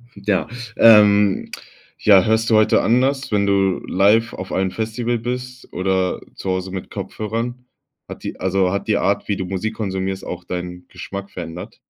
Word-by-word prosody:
Ja. 100 0 -1 0.3
Ähm, 105 -3 +6 0.5
ja, 95 -3 +6
hörst 110 +1 +2
du 110 - +4
heute 110 0 +4
anders, 130 +2 +1
wenn 100 -1 +2
du 95 -2 +2
live 105 +5 +3
auf 95 0 -7
einem 95 0 0
Festival 115 +2 -2
bist 125 +1 -6
oder 95 0 0
zu 95 - -5
Hause 95 0 -3
mit 95 -1 -6
Kopfhörern? 115 +3 -4 0.4
Hat - - -9
die - - -6
also 95 0 +1
hat 100 - -3
die 105 - +2
Art, 100 +2 0
wie 100 - -1
du 95 - -3
Musik 100 +4 -3
konsumierst, 95 -2 -3
auch 90 0 -6
deinen 90 0 -6
Geschmack 100 +2 -7
verändert? 90 +4 -8
100 Hz, 165 wpm, -20 LUFS, 95-110 Hz, 0.5 s, Ähm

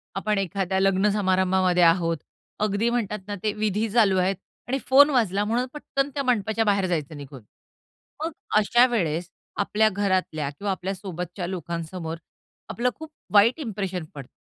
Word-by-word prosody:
आपण 210 +1 0
एखाद्या 190 0 -1
लग्न 195 +1 +3
समारंभामध्ये 185 -2 +2
आहोत. 165 -1 +3 0.4
अगदी 210 +2 +1
म्हणतात 215 -4 -1
ना 205 - -3
ते 210 -1 0
विधी 215 +1 -1
चालू 205 -5 +4
आहेत 190 +2 +1 0.3
आणि 265 - 0
फोन 285 +3 +7
वाजला 205 -7 +1
म्हणून 235 +4 0
पटकन 280 -1 -2
त्या 280 0 -2
मंडपाच्या 225 -3 +1
बाहेर 200 -2 +2
जायचं 155 -3 -3
निघून. 140 -3 -10 0.8
मग 330 - -2 0.3
अशा 240 +4 +5
वेळेस 170 -5 -1 0.3
आपल्या 215 +2 +2
घरातल्या 185 -7 -1
किंवा 195 +8 -4
आपल्या 190 +1 -3
सोबतच्या 180 -1 -6
लोकांसमोर 170 -1 -5 0.5
आपलं 245 +2 0
खूप 315 -1 -10 0.2
वाईट 225 +9 +5
इंप्रेशन 195 - -4
पडतं. 140 -3 -9
195 Hz, 150 wpm, -25 LUFS, 180-220 Hz, 0.8 s, फोन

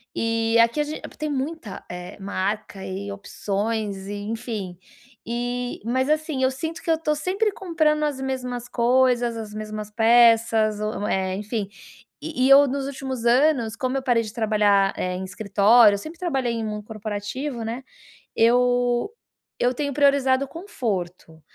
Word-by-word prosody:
e 225 0 +1
aqui 230 +5 +4
a - - +3
ge 305 +1 -6 0.2
tem 305 - -3
muita, 280 - -4
eh, 180 +2 -8
marca 200 0 -3
e 195 +2 -5
opções 200 0 -3
e 205 - -4
enfim, 210 -4 -5 0.5
e 245 +1 -3
mas, 260 +4 0
assim, 305 -3 0
eu 260 - +3
sinto 320 +5 -5
que - - -6
eu 325 - +4
tô 310 -1 0
sempre 380 +8 0
comprando 320 -6 0
as 285 -3 -1
mesmas 250 -2 -4
coisas, 245 -1 +2
as 220 -2 -7
mesmas 215 0 -6
peças, 225 -1 +4
ou 215 -1 -3
eh, 190 -1 0
enfim, 210 +1 -3 0.5
e 295 -5 -1
e - - +2
eu 275 +1 +8
nos 275 +1 -2
últimos 265 -3 -5
anos, 245 -2 +3
como 255 +3 -1
eu - - -1
parei 240 -3 +2
de 215 - -7
trabalhar, 210 -3 +2
eh, 180 0 -2
em 185 +1 -4
escritório, 205 +2 +4
eu - - -2
sempre 315 +10 -9
trabalhei 270 -9 -1
em 230 -1 -3
mundo 210 -1 -4
corporativo, 220 +4 -5
né, 235 +4 -4 0.5
eu 245 - +3 0.5
eu 245 +1 +1
tenho 285 +2 -2
priorizado 275 -1 +3
o - - -15
conforto, 195 - -5
235 Hz, 160 wpm, -24 LUFS, 210-270 Hz, 0.5 s, eu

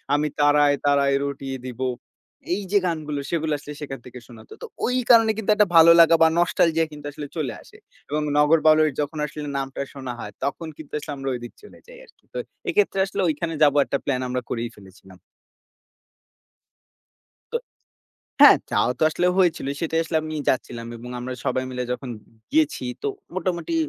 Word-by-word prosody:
আমি 150 +1 +1
তারায় 145 0 +4
তারায় 140 -1 +3
রটিয়ে 135 -1 -5
দিবো। 130 +1 -3 0.7
এই 200 - -1
যে 205 - +4
গানগুলো 155 -4 -2
সেগুলো 160 -2 -1
আসলে 145 +1 -9
সেখান 135 -3 -6
থেকে 125 0 -10
শোনাতো। 115 -3 -13
তো - - -5 0.2
ওই 250 - 0
কারণে 225 -2 +7
কিন্তু 220 -1 -5
একটা 210 -2 +4
ভালো 165 0 +9
লাগা 165 0 +7
বা - - +7
নস্টালজিয়া 165 -2 +2
কিন্তু 150 -1 -11
আসলে 145 0 -7
চলে 135 -7 -2
আসে - - -17 0.3
এবং 150 +1 -1 0.2
নগর 150 +2 +5
বাউলের 155 0 +6
যখন 150 +2 -4
আসলে 150 0 -7
নামটা 135 0 -4
শোনা 130 -3 -6
হয় 105 -2 -7
তখন 150 +4 -3
কিন্তু 155 - -12
আসলে 150 - -7
আমরা 135 0 -4
ঐদিক 120 0 -8
চলে - - -15
যাই - - -13
আরকি। - - -26
তো - - -5 0.3
এক্ষেত্রে 410 - +1
আসলে 195 - -3
ঐখানে 165 +2 -2
যাব 145 - +5
একটা 140 - -1
প্ল্যান 130 -3 0
আমরা 125 0 -2
করেই 115 0 -3
ফেলেছিলাম। 95 -1 -16 2.4
তো - - +2 0.8
হ্যাঁ - - +10
যাওয়া - - +2
তো - - -2
আসলে 175 +3 0
হয়েছিল 170 -6 +2
সেটাই 165 0 0
আসলে 160 0 -2
আমি 155 0 -5
যাচ্ছিলাম 120 -2 -1
এবং 120 +2 -10
আমরা 125 +1 -5
সবাই 130 - 0
মিলে 125 0 -3
যখন 125 0 -5 0.4
গিয়েছি 305 - +1 0.2
তো - - 0 0.3
মোটামুটি 185 - -2
150 Hz, 175 wpm, -23 LUFS, 130-165 Hz, 2.4 s, হ্যাঁ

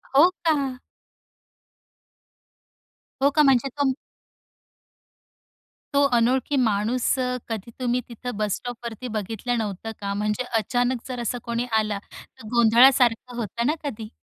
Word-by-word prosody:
हो 315 +6 +8 0.2
का? 280 -5 +1 2.4
हो, 280 - +5
का 300 +2 +3
म्हणजे 270 -2 +4
तुम 285 -2 +2 2.0
तो 280 0 +4
अनोळखी 255 +4 +1
माणूस, 230 0 +1 0.4
कधी 225 0 -5
तुम्ही, 250 0 0
तिथं 245 -1 -6
बस 210 -2 0
स्टॉपवरती 240 0 -7
बघितलं 225 +4 -2
नव्हतं 215 0 -4
का? 200 0 -2
म्हणजे 210 +4 -1 0.2
अचानक 245 +2 -1
जर 255 -2 -5
असा 240 +1 -2
कोणी 235 0 -2
आला, 210 -2 -2
तर 220 - -13
गोंधळासारखं 240 +1 +5
होतं 235 +1 -2
ना 300 - +3
कधी? 225 -6 -5
240 Hz, 120 wpm, -24 LUFS, 220-255 Hz, 2.4 s, हो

